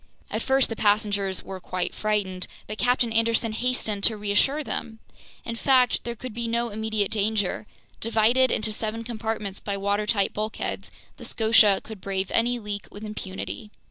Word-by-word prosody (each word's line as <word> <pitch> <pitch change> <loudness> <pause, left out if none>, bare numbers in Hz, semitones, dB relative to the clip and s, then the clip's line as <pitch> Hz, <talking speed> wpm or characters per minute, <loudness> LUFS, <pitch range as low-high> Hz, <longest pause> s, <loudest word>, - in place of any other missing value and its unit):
At - - -1
first 265 0 +3
the 225 - -3
passengers 205 -3 +1
were 190 -1 -7
quite 180 0 -3
frightened, 200 -4 -1 0.2
but 215 +1 -6
Captain 245 -2 +2
Anderson 230 0 +2
hastened 220 -3 -1
to 220 - +6
reassure 210 +9 +2
them. 225 -5 -4 0.5
In 230 - -3
fact, 255 0 +3
there 235 0 -3
could 250 0 -7
be 235 +1 -2
no 235 +1 0
immediate 220 -1 -1
danger. 210 -1 0 0.3
Divided 230 +3 +3
into 215 0 0
seven 220 +1 -3
compartments 220 -4 -3
by 200 -1 -3
watertight 200 +1 +1
bulkheads, 215 +1 -3 0.3
the - - -11
Scotia 220 -3 +5
could 215 -3 -9
brave 190 0 -2
any 240 +2 +2
leak 205 -3 -5
with 205 - -10
impunity. 210 0 -6
215 Hz, 160 wpm, -25 LUFS, 205-230 Hz, 0.5 s, to